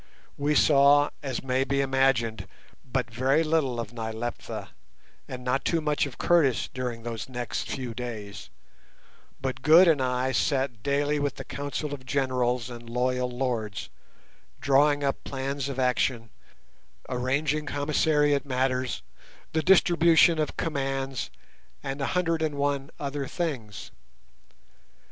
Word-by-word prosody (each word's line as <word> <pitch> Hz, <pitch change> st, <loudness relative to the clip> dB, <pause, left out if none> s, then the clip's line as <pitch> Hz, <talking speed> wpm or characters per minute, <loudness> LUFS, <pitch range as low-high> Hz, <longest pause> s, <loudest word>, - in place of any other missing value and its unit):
We 145 Hz, +1 st, 0 dB
saw, 145 Hz, 0 st, +5 dB
as 135 Hz, -4 st, -4 dB
may 130 Hz, 0 st, +1 dB
be 140 Hz, 0 st, -1 dB
imagined, 130 Hz, -7 st, +1 dB, 0.4 s
but 125 Hz, -2 st, -2 dB
very 135 Hz, +6 st, +2 dB
little 155 Hz, -6 st, 0 dB
of 115 Hz, 0 st, -5 dB
Nyleptha 115 Hz, +1 st, -5 dB, 0.6 s
and 125 Hz, -1 st, -7 dB
not 125 Hz, +2 st, 0 dB
too 165 Hz, -, +1 dB
much 150 Hz, -2 st, 0 dB
of 135 Hz, -, -11 dB
Curtis 155 Hz, -9 st, +3 dB
during 125 Hz, -3 st, -4 dB
those 115 Hz, +1 st, -5 dB
next 120 Hz, -2 st, -4 dB
few 125 Hz, -3 st, -4 dB
days, 110 Hz, -4 st, -7 dB, 0.9 s
but 130 Hz, -1 st, -3 dB
Good 160 Hz, +7 st, +7 dB
and 155 Hz, -5 st, +4 dB
I 125 Hz, 0 st, 0 dB
sat 130 Hz, -3 st, 0 dB
daily 145 Hz, +3 st, +1 dB
with 145 Hz, -2 st, -1 dB
the -, -, -7 dB
council 145 Hz, +2 st, -4 dB
of 135 Hz, -3 st, -7 dB
generals 125 Hz, -2 st, 0 dB
and 120 Hz, -1 st, -9 dB
loyal 125 Hz, +1 st, 0 dB
lords, 120 Hz, -5 st, -3 dB, 0.7 s
drawing 145 Hz, +1 st, +3 dB
up 140 Hz, -1 st, -1 dB
plans 135 Hz, 0 st, -3 dB
of 135 Hz, -, -5 dB
action, 125 Hz, -2 st, 0 dB, 0.8 s
arranging 140 Hz, +4 st, -1 dB
commissariat 145 Hz, 0 st, +2 dB
matters, 130 Hz, -1 st, -1 dB, 0.5 s
the 160 Hz, -, +2 dB
distribution 170 Hz, -2 st, +5 dB
of 155 Hz, -, -2 dB
commands, 135 Hz, -4 st, -2 dB, 0.5 s
and 135 Hz, +1 st, -4 dB
a 135 Hz, -, 0 dB
hundred 165 Hz, -2 st, +1 dB
and 155 Hz, -2 st, -1 dB
one 140 Hz, 0 st, -1 dB
other 140 Hz, -1 st, -3 dB
things. 125 Hz, -, -4 dB
135 Hz, 130 wpm, -27 LUFS, 125-145 Hz, 0.9 s, Good